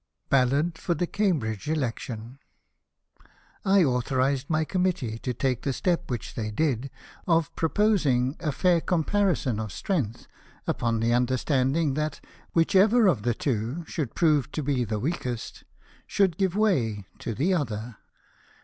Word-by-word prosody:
BALLAD 140 Hz, +5 st, +2 dB
FOR 170 Hz, -, -1 dB
THE 175 Hz, -, 0 dB
CAMBRIDGE 150 Hz, -, -1 dB
ELECTION 125 Hz, -4 st, -3 dB, 0.4 s
' -, -, -48 dB
' -, -, -33 dB
I 195 Hz, -1 st, +5 dB
authorized 130 Hz, +1 st, 0 dB
my 155 Hz, -1 st, +1 dB
Committee 170 Hz, -12 st, -1 dB
to 125 Hz, -, -3 dB
talce 130 Hz, -1 st, -1 dB
the 135 Hz, -, -1 dB
step 175 Hz, +4 st, -1 dB
which 120 Hz, -4 st, -4 dB
they 110 Hz, -2 st, -3 dB
did, 135 Hz, +2 st, 0 dB, 0.4 s
of 165 Hz, -3 st, +2 dB
proposing 160 Hz, -, +2 dB
a 155 Hz, -4 st, -1 dB
fair 175 Hz, +4 st, +2 dB
comparison 175 Hz, -, +1 dB
of 110 Hz, -2 st, -4 dB
strength, 125 Hz, -, -2 dB, 0.4 s
upon 115 Hz, -1 st, 0 dB
the 115 Hz, +1 st, +2 dB
under 125 Hz, +1 st, +2 dB
standing 140 Hz, +3 st, +1 dB
that 150 Hz, +2 st, -2 dB, 0.3 s
whichever 200 Hz, +7 st, +4 dB
of 160 Hz, -, +3 dB
the 120 Hz, +1 st, 0 dB
iivo 125 Hz, +6 st, -2 dB
should 150 Hz, -7 st, -4 dB
prove 150 Hz, -5 st, +2 dB
to 155 Hz, -, -2 dB
be 130 Hz, -4 st, 0 dB
tJie 105 Hz, +1 st, -2 dB
weakest^ 125 Hz, -8 st, -6 dB, 0.4 s
should 190 Hz, -5 st, +2 dB
give 190 Hz, -2 st, +1 dB
way 120 Hz, -, +1 dB
to 115 Hz, -, -4 dB
the 165 Hz, -, +1 dB
other." 115 Hz, -, -3 dB
140 Hz, 150 wpm, -26 LUFS, 120-170 Hz, 0.4 s, I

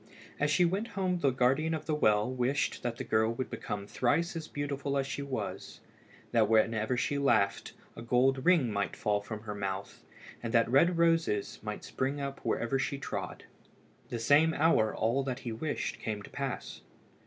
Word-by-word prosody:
As 150 Hz, -, +2 dB
she 175 Hz, +4 st, +4 dB
went 195 Hz, +6 st, -1 dB
home 185 Hz, -2 st, 0 dB
the 140 Hz, -, +3 dB
guardian 135 Hz, +6 st, +2 dB
of 155 Hz, -, -6 dB
the 155 Hz, -, -1 dB
well 105 Hz, -8 st, +3 dB
wished 130 Hz, +2 st, -1 dB
that 120 Hz, -1 st, -3 dB
the -, -, -4 dB
girl 110 Hz, +1 st, +2 dB
would 130 Hz, -, -4 dB
become 100 Hz, -1 st, -4 dB
thrice 165 Hz, -, 0 dB
as 160 Hz, -1 st, -5 dB
beautiful 140 Hz, -1 st, -3 dB
as 135 Hz, -, +1 dB
she 140 Hz, -, -4 dB
was, 140 Hz, -2 st, -5 dB, 0.5 s
that 110 Hz, -3 st, +3 dB
whenever 110 Hz, +2 st, +2 dB
she 140 Hz, +3 st, 0 dB
laughed 110 Hz, -8 st, +1 dB, 0.2 s
a -, -, -8 dB
gold 130 Hz, +3 st, +2 dB
ring 165 Hz, -10 st, +4 dB
might 100 Hz, 0 st, -1 dB
fall 105 Hz, -1 st, 0 dB
from 105 Hz, +1 st, -7 dB
her 105 Hz, -1 st, -5 dB
mouth, 100 Hz, -1 st, -5 dB, 0.4 s
and 115 Hz, 0 st, -4 dB
that 115 Hz, -, +5 dB
red 165 Hz, +8 st, +4 dB
roses 165 Hz, -11 st, +1 dB
might -, -, -5 dB
spring 135 Hz, +2 st, -2 dB
up 140 Hz, -1 st, -4 dB
wherever 120 Hz, +3 st, -1 dB
she 140 Hz, +1 st, -1 dB
trod. 140 Hz, -, -5 dB, 0.7 s
The 120 Hz, -, -3 dB
same 145 Hz, +7 st, +4 dB
hour 140 Hz, -9 st, +3 dB
all 115 Hz, +5 st, +1 dB
that 135 Hz, 0 st, -4 dB
he 120 Hz, -, -4 dB
wished 145 Hz, +7 st, -3 dB
came 105 Hz, -2 st, -4 dB
to -, -, -12 dB
pass. 135 Hz, -3 st, -5 dB
130 Hz, 185 wpm, -31 LUFS, 110-145 Hz, 0.7 s, that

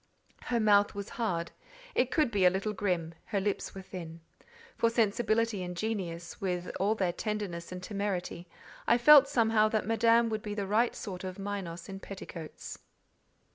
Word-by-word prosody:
Her 240 Hz, -, 0 dB
mouth 205 Hz, -2 st, +4 dB
was 200 Hz, -1 st, -5 dB
hard: 175 Hz, -8 st, -2 dB, 0.4 s
it 250 Hz, -, +2 dB
could 300 Hz, -4 st, +2 dB
be 200 Hz, -3 st, +1 dB
a 180 Hz, -, +8 dB
little 195 Hz, +3 st, -2 dB
grim; 180 Hz, -5 st, -1 dB
her 200 Hz, -, -1 dB
lips 200 Hz, 0 st, -2 dB
were 190 Hz, -, -7 dB
thin. 170 Hz, -3 st, -8 dB, 0.6 s
For 230 Hz, -, +2 dB
sensibility 230 Hz, -1 st, +1 dB
and 180 Hz, -1 st, -5 dB
genius, 175 Hz, -6 st, -4 dB
with 180 Hz, -2 st, -2 dB
all 205 Hz, +3 st, +2 dB
their 185 Hz, -5 st, 0 dB
tenderness 195 Hz, -5 st, -4 dB
and 180 Hz, 0 st, -7 dB
temerity, 190 Hz, -3 st, -3 dB, 0.4 s
I 235 Hz, -, +5 dB
felt 285 Hz, +3 st, +8 dB
somehow 225 Hz, -5 st, +3 dB
that 215 Hz, -1 st, 0 dB
Madame 230 Hz, +1 st, +4 dB
would 220 Hz, -1 st, -2 dB
be 210 Hz, -1 st, -5 dB
the 200 Hz, -1 st, -2 dB
right 220 Hz, +5 st, +2 dB
sort 185 Hz, -3 st, -6 dB
of 185 Hz, -1 st, -5 dB
Minos 195 Hz, -4 st, -5 dB
in 195 Hz, 0 st, -7 dB
petticoats. 180 Hz, -5 st, -8 dB
200 Hz, 170 wpm, -30 LUFS, 180-225 Hz, 0.6 s, a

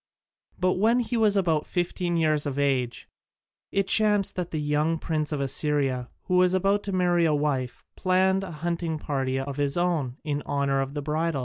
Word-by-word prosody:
But 185 Hz, 0 st, +1 dB
when 230 Hz, +4 st, +3 dB
he 235 Hz, 0 st, -3 dB
was 215 Hz, -3 st, +3 dB
about 165 Hz, -5 st, +1 dB
fifteen 175 Hz, -1 st, -1 dB
years 155 Hz, -2 st, +1 dB
of 140 Hz, -1 st, -4 dB
age, 135 Hz, -4 st, -1 dB, 0.6 s
it 195 Hz, -1 st, 0 dB
chanced 210 Hz, -2 st, +3 dB
that 175 Hz, -1 st, -3 dB
the 155 Hz, -, -4 dB
young 150 Hz, +2 st, 0 dB
Prince 155 Hz, -1 st, -2 dB
of 150 Hz, -, -2 dB
Assyria, 135 Hz, -2 st, 0 dB
who 180 Hz, -, 0 dB
was 180 Hz, 0 st, +4 dB
about 195 Hz, +2 st, +2 dB
to 200 Hz, -, -3 dB
marry 175 Hz, -2 st, +2 dB
a 155 Hz, -2 st, +2 dB
wife, 140 Hz, -4 st, -2 dB
planned 190 Hz, +1 st, +2 dB
a 190 Hz, -, -6 dB
hunting 170 Hz, 0 st, -3 dB
party 135 Hz, -3 st, -2 dB
of 135 Hz, +1 st, -5 dB
his 145 Hz, 0 st, 0 dB
own, 160 Hz, -8 st, 0 dB
in 145 Hz, -2 st, -2 dB
honour 140 Hz, -1 st, 0 dB
of 135 Hz, +2 st, -5 dB
the 145 Hz, -, -3 dB
bridal. 155 Hz, 0 st, -1 dB
160 Hz, 190 wpm, -26 LUFS, 145-185 Hz, 0.6 s, was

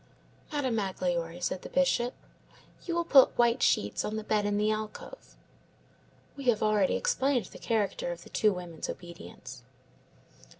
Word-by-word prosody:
"Madame 265 Hz, -6 st, 0 dB
Magloire," 175 Hz, -4 st, -2 dB
said 180 Hz, +1 st, -2 dB
the -, -, -9 dB
Bishop, 255 Hz, -2 st, +1 dB, 0.7 s
"you 340 Hz, -, -1 dB
will 340 Hz, -, +1 dB
put 275 Hz, -5 st, +6 dB
white 240 Hz, +1 st, +3 dB
sheets 100 Hz, 0 st, +2 dB
on 215 Hz, -, -3 dB
the 220 Hz, -, -3 dB
bed 210 Hz, -1 st, +1 dB
in 205 Hz, 0 st, 0 dB
the 210 Hz, +1 st, +2 dB
alcove." 215 Hz, -, -6 dB, 1.0 s
We 275 Hz, -, -8 dB
have 235 Hz, -4 st, +3 dB
already 210 Hz, -3 st, +3 dB
explained 265 Hz, -3 st, +1 dB
the -, -, -12 dB
character 230 Hz, -, -1 dB
of -, -, -7 dB
the -, -, -14 dB
two 215 Hz, -, +3 dB
women's 175 Hz, -4 st, -6 dB
obedience. 170 Hz, -, -9 dB
215 Hz, 155 wpm, -29 LUFS, 185-265 Hz, 1.0 s, put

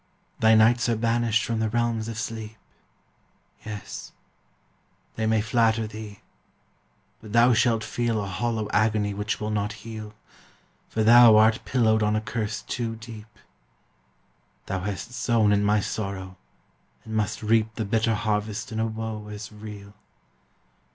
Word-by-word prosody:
Thy 110 Hz, 0 st, +5 dB
nights 120 Hz, +2 st, +4 dB
are 115 Hz, -, +2 dB
banished 115 Hz, 0 st, +1 dB
from 115 Hz, -1 st, -2 dB
the 110 Hz, -1 st, 0 dB
realms 115 Hz, -1 st, -1 dB
of 115 Hz, -1 st, -5 dB
sleep: 110 Hz, -1 st, -5 dB, 1.1 s
Yes! 105 Hz, -2 st, -8 dB, 1.0 s
they 110 Hz, 0 st, -1 dB
may 110 Hz, -1 st, +2 dB
flatter 115 Hz, 0 st, +2 dB
thee, 105 Hz, -1 st, -9 dB, 1.0 s
but 110 Hz, -1 st, -11 dB
thou 120 Hz, +1 st, +6 dB
shall 115 Hz, 0 st, +3 dB
feel 115 Hz, 0 st, -1 dB
A 100 Hz, -, -2 dB
hollow 110 Hz, +3 st, -2 dB
agony 105 Hz, -1 st, +2 dB
which 105 Hz, +2 st, -3 dB
will 105 Hz, 0 st, -3 dB
not 105 Hz, 0 st, -1 dB
heal, 110 Hz, -1 st, -8 dB, 0.7 s
For 110 Hz, -, 0 dB
thou 120 Hz, 0 st, +8 dB
art 110 Hz, +3 st, +4 dB
pillowed 110 Hz, -4 st, +2 dB
on 105 Hz, 0 st, +2 dB
a 110 Hz, -, 0 dB
curse 110 Hz, -1 st, -3 dB
too 115 Hz, -2 st, -3 dB
deep; 115 Hz, -1 st, -10 dB, 1.4 s
Thou 95 Hz, 0 st, -3 dB
hast 95 Hz, +3 st, -5 dB
sown 115 Hz, -2 st, +2 dB
in 100 Hz, 0 st, +3 dB
my 105 Hz, +1 st, +3 dB
sorrow, 95 Hz, -2 st, -4 dB, 0.7 s
and 110 Hz, -, -5 dB
must 110 Hz, +1 st, -1 dB
reap 110 Hz, 0 st, +2 dB
The 110 Hz, -, -2 dB
bitter 115 Hz, +2 st, +1 dB
harvest 105 Hz, 0 st, -2 dB
in 110 Hz, -, -3 dB
a 110 Hz, -, +1 dB
woe 110 Hz, -1 st, -5 dB
as 105 Hz, 0 st, -8 dB
real! 105 Hz, -1 st, -10 dB
110 Hz, 145 wpm, -25 LUFS, 105-115 Hz, 1.4 s, thou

